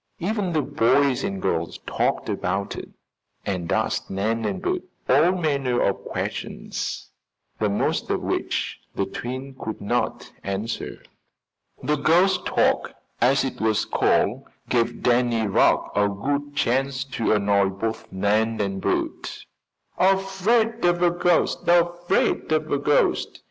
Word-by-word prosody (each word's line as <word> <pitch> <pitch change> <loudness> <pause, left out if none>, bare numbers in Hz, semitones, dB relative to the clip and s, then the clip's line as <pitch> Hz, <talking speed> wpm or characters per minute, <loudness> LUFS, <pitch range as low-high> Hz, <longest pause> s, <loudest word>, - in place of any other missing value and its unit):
Even 195 0 -1
the 155 -2 +1
boys 130 +4 +2
and 195 0 -2
girls 85 - -1
talked - - 0
about 95 +2 -2
it - - -7 0.6
and 90 -4 -2
asked - - 0
Nan 110 +4 -1
and 105 - -2
Bert 370 -1 -1 0.3
all 150 +7 +5
manner 140 -8 0
of 100 - 0
questions, - - -4 0.5
the 105 - +1
most 100 - 0
of - - +1
which - - -2 0.2
the - - 0
twins 130 +2 -6
could 110 - -4
not 120 +4 -2
answer. 100 +4 -4 0.8
The 150 +3 +1
"ghost 175 +7 +3
talk," - - +1 0.3
as 130 +3 +4
it 135 - -4
was 110 -1 +2
called, - - +2 0.3
gave 120 -1 0
Danny 120 -2 +2
Rugg 100 - +3
a 100 0 +3
good 145 +8 -3
chance 130 +1 +1
to 120 -5 0
annoy 100 -2 +3
both 110 +4 -4
Nan 110 +4 +1
and 100 -2 -2
Bert. - - -2 0.5
"Afraid 195 +5 +2
of 175 0 +3
a 175 - +5
ghost! 175 0 +2
Afraid 175 -1 +2
of 155 0 +1
a 145 - +2
ghost!" 145 +1 +1
130 Hz, 135 wpm, -24 LUFS, 105-170 Hz, 0.8 s, all